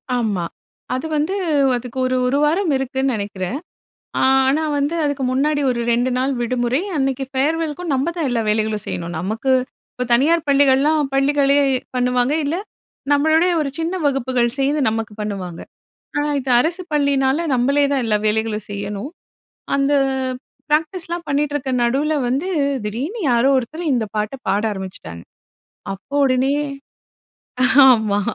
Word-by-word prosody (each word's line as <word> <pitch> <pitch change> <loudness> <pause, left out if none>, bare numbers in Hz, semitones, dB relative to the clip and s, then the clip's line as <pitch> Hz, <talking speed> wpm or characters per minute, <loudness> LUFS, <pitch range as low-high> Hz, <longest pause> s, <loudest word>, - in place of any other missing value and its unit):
ஆமா. 210 -8 -1 0.5
அது 260 +5 -4
வந்து 310 +6 0 0.4
அதுக்கு 245 +1 -6
ஒரு 255 - 0
1 275 +3 +1
வாரம் 330 +3 +2
இருக்குன்னு 265 0 -1
நெனைக்கிறேன். 200 +2 -4 0.6
ஆ - - +1 0.3
ஆனா 300 +4 +2
வந்து 285 +3 0
அதுக்கு 285 -2 -1
முன்னாடி 290 +3 +1
ஒரு 235 -1 -1
2 245 +2 +1
நாள் 265 +2 0
விடுமுறை. 245 +4 0 0.2
அன்னைக்கு 270 -1 0
ஃபேர்வெல்க்கும் 315 +4 -1
நம்ப 265 +3 0
தான் 325 -5 -1
எல்லா 235 -2 0
வேலைகளும் 215 -1 0
செய்யணும். 170 0 -4
நமக்கு 220 +9 -1 0.4
இப்ப 250 - -3
தனியார் 305 +7 +3
பள்ளிகள்லாம் 280 +1 +3
பள்ளிகளே 280 +1 +3 0.4
பண்ணுவாங்க, 250 +1 +1
இல்ல 300 +4 -1 0.6
நம்மளுடைய 315 +5 +3
ஒரு 280 - -1
சின்ன 330 +3 -1
வகுப்புகள் 260 -3 +1
சேர்ந்து 280 +2 +1
நமக்கு 225 -1 -3
பண்ணுவாங்க. 190 -5 -5 0.6
ஆனா 295 0 0
இது 260 -1 -5
அரசு 335 +7 0
பள்ளியினால 280 +1 +2
நம்பளே 275 +4 +2
தான் 265 -3 +1
எல்லா 210 -1 +2
வேலைகளும் 215 0 -1
செய்யணும். 205 +6 -5 0.6
அந்த 275 +1 +2 0.8
ப்ராக்டிஸ்லாம் 335 +2 -1
பண்ணிட்டிருக்க 290 -1 -1
நடுவில 275 +6 +1
வந்து, 275 +9 -1 0.4
திடீர்னு 260 - -4
யாரோ 240 +3 +3
ஒருத்தர் 300 +7 -4
இந்த 230 -3 0
பாட்ட 215 +4 -2
பாட 200 +2 +2
ஆரம்பிச்சுட்டாங்க. 185 - -7 0.7
அப்போ 200 +9 -8
உடனே 260 +1 +2 1.4
ஆமா 220 -5 +3
265 Hz, 135 wpm, -20 LUFS, 230-290 Hz, 1.4 s, தனியார்